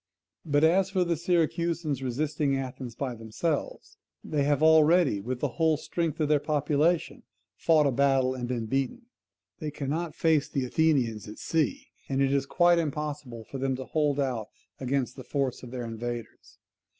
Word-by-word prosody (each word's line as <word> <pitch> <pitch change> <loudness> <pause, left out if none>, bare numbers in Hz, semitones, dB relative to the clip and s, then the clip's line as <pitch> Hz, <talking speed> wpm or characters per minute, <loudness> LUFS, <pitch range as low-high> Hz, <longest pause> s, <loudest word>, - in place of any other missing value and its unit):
But 145 -1 +1
as 185 +4 +4
for 185 - +1
the 170 -1 0
Syracusans 170 -3 0
resisting 140 +2 0
Athens 130 -2 -6
by 130 0 -3
themselves, 115 +8 -3 0.3
they 145 -2 0
have 145 +1 +2
already 160 - +5
with 125 +4 -4
the 145 - +2
whole 160 -2 +3
strength 165 0 -3
of 155 - +2
their 150 0 +3
population 150 +3 +1 0.3
fought 155 -2 +3
a 140 - +3
battle 135 0 +2
and 125 -2 -4
been 120 -2 -2
beaten; 135 - -2 0.6
they 155 -3 -3
cannot 150 +3 -3
face 160 -3 +2
the 135 -3 -1
Athenians 125 -8 +1
at 105 - -9
sea; 270 - -1 0.2
and 135 0 0
it 135 0 +2
is 140 -1 +1
quite 175 +1 +4
impossible 150 -6 -4
for 135 +4 -8
them 135 0 0
to 130 0 -6
hold 145 -1 0
out 125 -6 -1 0.3
against 130 -1 -1
the 130 - -7
force 135 -1 -2
of 125 - -9
their 125 -1 -5
invaders. 115 0 -6
140 Hz, 170 wpm, -28 LUFS, 130-160 Hz, 0.6 s, already